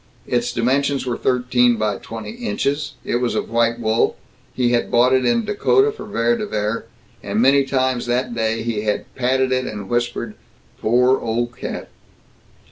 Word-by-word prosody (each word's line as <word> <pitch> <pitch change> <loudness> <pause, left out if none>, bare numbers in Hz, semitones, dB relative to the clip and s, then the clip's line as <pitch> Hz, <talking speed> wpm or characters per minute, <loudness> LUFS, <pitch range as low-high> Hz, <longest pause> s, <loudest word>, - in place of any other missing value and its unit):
Its 120 0 0
dimensions 135 +4 +1
were 125 -2 -1
thirteen 125 -1 +2
by 105 -2 0
twenty 115 - -7
inches, 155 - -2
it - - 0
was 125 -1 -1
of - - -2
white 115 0 +2
wool, 110 0 +1 0.4
he 125 -2 +1
had 120 -1 +1
bought 125 +2 +4
it 130 0 +3
in 235 -2 +2
Dakota 400 - +3
for 435 - -9
Vere 235 - +1
de 215 -2 -3
Vere, 105 - -2 0.4
and 100 +1 -2
many 135 +3 +5
times 130 -2 0
that 125 0 0
day 115 -1 -1
he 115 -3 -2
had 105 -1 -1
patted 130 +1 +1
it 130 0 +1
and 105 -2 -6
whispered, 120 -2 -1 0.5
"Poor 125 +4 +3
old 120 +2 -2
cat." - - -6
120 Hz, 170 wpm, -20 LUFS, 115-130 Hz, 0.5 s, many